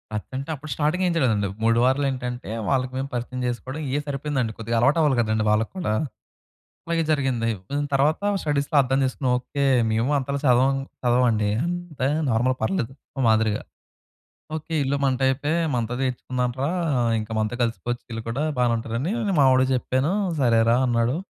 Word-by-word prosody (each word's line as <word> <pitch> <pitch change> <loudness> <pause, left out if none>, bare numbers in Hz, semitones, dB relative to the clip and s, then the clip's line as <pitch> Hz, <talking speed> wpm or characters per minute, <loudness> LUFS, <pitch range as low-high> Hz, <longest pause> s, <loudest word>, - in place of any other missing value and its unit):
అది 105 - -3
అంటే 135 +4 -4
అప్పుడు 150 +2 -10
స్టార్టింగ్ 155 +7 0
ఏమి 175 - +1
చేయలేదండి. 110 -10 +2 0.2
3 115 +1 +3
వారాలు 135 +2 +2
ఏంటంటే, 125 -4 -5 0.2
వాళ్ళకి 130 -2 +1
మేము 135 +1 -3
పరిచయం 125 +1 -3
చేసుకోవడం 130 +5 -4
ఇయే 140 +3 0
సరిపోయిందండి 140 -5 -2
కొద్దిగా 115 +1 -3
అలవాటు 130 +7 +3
అవ్వాలి 145 -5 +3
కదండి! 110 -1 0
వాళ్ళకి 110 +1 +1
కూడా. 175 -12 -1 0.9
అలాగే 165 0 +1
జరిగింది 135 -6 +1 0.4
తర్వాత 140 +3 +2 0.2
స్టడీస్‌లో 145 0 0
అర్థం 135 +1 0
చేసుకున్నాం 130 0 0
ఓకే. 140 +3 -3 0.3
మేము 115 +5 +1
అంతలా 140 +1 -2
చదవం 130 +1 +4 0.3
చదవమండి 120 -4 +2
అంత 175 -3 -5 0.3
నార్మల్ 125 +3 +2
పర్లేదు 135 -11 -1 0.2
ఓ - - -2
మాదిరిగా. 110 -1 +2 1.0
ఓకే, 160 +1 -6
ఈళ్ళు 140 +1 0
మన 135 -1 +3
టైపే 135 +3 +1 0.2
మంతో 120 0 -1
చేర్చుకుందాంరా, 125 +1 -2 0.5
ఇంకా 110 +1 -6
మనతో 110 +2 -1
కలిసిపోవచ్చు 120 +1 -3
వీళ్ళు 115 -1 -4
కూడా 130 +6 -1 0.2
బానే 120 -1 +3
ఉంటదని 115 - -3 0.3
మా 140 - +6
వాడికి 130 0 +3
చెప్పాను 130 +7 0 0.3
సరేరా 115 -1 +4
అన్నాడు. 120 +2 +1
130 Hz, 155 wpm, -24 LUFS, 115-140 Hz, 1.0 s, మా